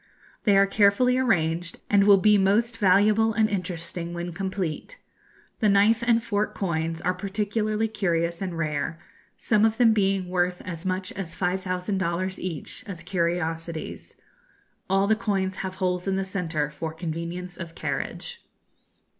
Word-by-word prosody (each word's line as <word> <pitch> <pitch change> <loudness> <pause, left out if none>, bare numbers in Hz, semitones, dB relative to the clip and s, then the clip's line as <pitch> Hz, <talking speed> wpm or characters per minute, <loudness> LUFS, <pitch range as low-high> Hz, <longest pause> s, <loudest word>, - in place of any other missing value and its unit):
They 200 -3 +5
are 195 - +6
carefully 210 +6 +3
arranged, 170 -8 0
and 200 -1 +4
will 200 -1 +8
be 210 +2 +5
most 215 +4 +2
valuable 210 +3 +4
and 220 0 +3
interesting 175 -3 -3
when 175 0 -4
complete. 190 - -4 0.6
The 215 - +3
knife 205 +3 +4
and 235 -1 +3
fork 210 -2 -1
coins 165 -3 -2
are 180 - +1
particularly 210 +3 -1
curious 170 -5 -1
and 180 -3 -3
rare, 155 0 -2 0.4
some 215 -1 +2
of 225 0 +3
them 230 -3 +5
being 195 -3 +1
worth 180 0 0
as 180 0 -5
much 185 0 -2
as 175 -4 -6
5,000 185 +1 -1
dollars 185 +2 -2
each, 170 -5 -5
as 180 -4 -7
curiosities. 170 -2 -3 0.7
All 195 +1 +3
the 220 +2 +3
coins 195 -3 -1
have 185 -1 -4
holes 180 -1 -1
in 195 - +1
the 195 0 -1
centre 165 -6 -2
for 160 +2 -5
convenience 170 +2 -5
of 170 -2 -8
carriage. 480 -1 -4
190 Hz, 150 wpm, -25 LUFS, 170-205 Hz, 0.7 s, will